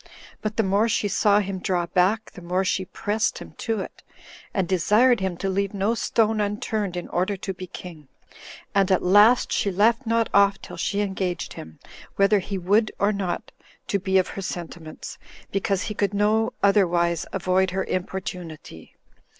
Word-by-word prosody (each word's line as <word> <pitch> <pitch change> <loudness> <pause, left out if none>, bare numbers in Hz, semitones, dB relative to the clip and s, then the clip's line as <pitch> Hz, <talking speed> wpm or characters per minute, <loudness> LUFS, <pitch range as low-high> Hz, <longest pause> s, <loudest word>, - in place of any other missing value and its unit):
But 215 0 -3
the 225 - +3
more 200 +4 +2
she 210 - +1
saw 205 +1 +3
him 195 -1 -4
draw 180 -1 0
back, 190 +5 +1
the 180 - -12
more 180 +2 -1
she 185 +1 0
pressed 210 +3 -1
him - - -10
to 225 -3 -1
it, - - -9 0.5
and 190 -3 -1
desired 210 +8 +4
him 190 -2 -2
to 195 - -3
leave 200 +1 -1
no 200 +3 +1
stone 220 -2 +1
unturned 205 -2 -2
in 175 - -5
order 185 +3 -1
to 190 0 -4
be 185 0 -8
king; 165 -5 -10 0.7
and 195 -1 +2
at 185 - +3
last 210 +6 +5
she 200 - +1
left 225 +6 +2
not 230 0 +2
off 200 0 +4
till - - -10
she 205 0 -1
engaged 190 -3 -2
him, 80 0 -10 0.4
whether 200 +1 +4
he 195 +1 -4
would 205 +5 +2
or 205 +1 +2
not, 195 -3 -3 0.4
to 200 - +1
be 190 0 +1
of 185 - +2
her 195 - -6
sentiments, 170 -3 -7 0.3
because 195 -1 0
he 210 - -4
could 200 -1 -1
no 220 +4 +2
otherwise 175 -4 +2
avoid 190 0 +1
her 190 +1 -1
importunity. 180 - -6
195 Hz, 175 wpm, -24 LUFS, 180-210 Hz, 0.7 s, last